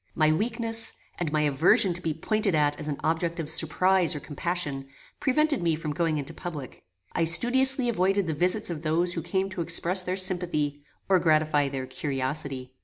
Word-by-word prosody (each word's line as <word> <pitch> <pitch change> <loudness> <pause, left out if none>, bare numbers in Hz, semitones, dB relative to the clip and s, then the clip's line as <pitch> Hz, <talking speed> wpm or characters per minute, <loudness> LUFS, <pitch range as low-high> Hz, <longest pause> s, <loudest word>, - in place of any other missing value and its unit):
My 155 0 +3
weakness, 225 +5 -1 0.3
and 170 -4 -2
my 155 0 0
aversion 150 +6 +3
to 175 - -9
be 165 - -2
pointed 195 +4 -1
at 145 -1 +1
as 150 - -3
an 145 -2 -3
object 165 +2 -1
of 160 -1 -4
surprize 175 +2 +2
or - - -4
compassion, 145 -3 -4 0.3
prevented 295 - +1
me 165 -2 +1
from 155 -1 -5
going 165 -1 -1
into 145 +2 -5
public. 155 -7 -8 0.3
I - - 0
studiously 260 - +5
avoided 195 -3 0
the 160 - -2
visits 180 +5 +3
of 155 -3 -6
those 170 +3 0
who 165 - -4
came 190 +3 -2
to 185 -2 -5
express 170 +2 +2
their 185 +1 -3
sympathy, 175 -6 0 0.3
or 190 -1 +3
gratify 155 -3 +1
their 135 -1 -5
curiosity. 130 0 -5
165 Hz, 180 wpm, -26 LUFS, 150-185 Hz, 0.3 s, studiously